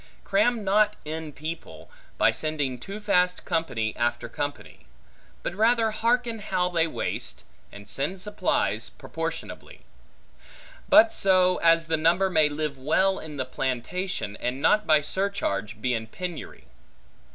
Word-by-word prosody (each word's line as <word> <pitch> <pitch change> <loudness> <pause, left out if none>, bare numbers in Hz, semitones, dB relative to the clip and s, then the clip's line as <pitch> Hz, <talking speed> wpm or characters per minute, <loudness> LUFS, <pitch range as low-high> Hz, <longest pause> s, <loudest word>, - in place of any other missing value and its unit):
Cram 220 +3 +2
not 210 +2 +3
in 155 0 -5
people, 145 - -8 0.3
by - - +4
sending 145 -5 -2
too 195 - -7
fast 180 -4 +1
company 145 - -1
after 120 0 -1
company; 145 - -6 0.6
but - - -3
rather 225 +2 +3
harken 235 +1 0
how 185 -3 0
they 165 -2 +2
waste, - - -4 0.3
and 100 0 -12
send 140 - -2
supplies 210 +3 0
proportionably; - - -6 1.1
but 320 +3 +7
so, 185 - +4
as 165 0 +4
the 160 -1 0
number 175 +5 +3
may 155 -3 +4
live 150 -2 -3
well 190 +8 +2
in 150 -2 -8
the 130 - -2
plantation, 130 - -3
and 125 +2 -3
not 210 +8 +3
by 155 -1 +5
surcharge 150 - -2
be 125 -1 0
in 110 -1 -3
penury. 175 +7 -7
165 Hz, 135 wpm, -26 LUFS, 135-195 Hz, 1.1 s, but